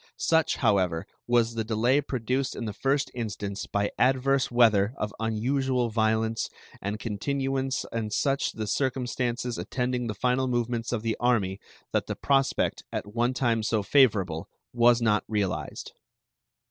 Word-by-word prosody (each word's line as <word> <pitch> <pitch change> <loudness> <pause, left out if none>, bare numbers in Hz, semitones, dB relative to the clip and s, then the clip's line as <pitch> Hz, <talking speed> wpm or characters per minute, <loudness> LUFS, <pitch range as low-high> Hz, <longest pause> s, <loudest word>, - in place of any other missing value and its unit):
Such, 160 -1 +2
however, 95 -7 +1 0.2
was 120 -1 +3
the 115 -1 -2
delay 120 +6 +2
produced 130 0 -2
in 115 - -4
the 105 - -4
first 135 +4 0
instance 105 -4 -4
by 100 0 0
adverse 135 +1 +3
weather 115 -2 +4
of 105 -1 -3
unusual 125 +3 0
violence 110 0 +1 0.3
and 100 +2 -3
continuance 135 +5 -2
and 110 -2 -3
such 135 +5 0
the 110 - -4
circumstances 125 0 -1
attending 125 -1 -2
the 105 - -3
final 125 +4 +1
movements 120 -1 -1
of 115 -3 -2
the 115 -1 0
army, 105 -6 +1 0.3
that - - 0
the - - -3
prospect, 135 -1 +1
at 105 - -5
one 120 +2 +1
time 115 -3 +1
so 110 -1 0
favorable, 100 - +3 0.2
was 120 0 +4
not 105 -2 +3
realized. 100 -4 -2
120 Hz, 145 wpm, -27 LUFS, 110-130 Hz, 0.3 s, weather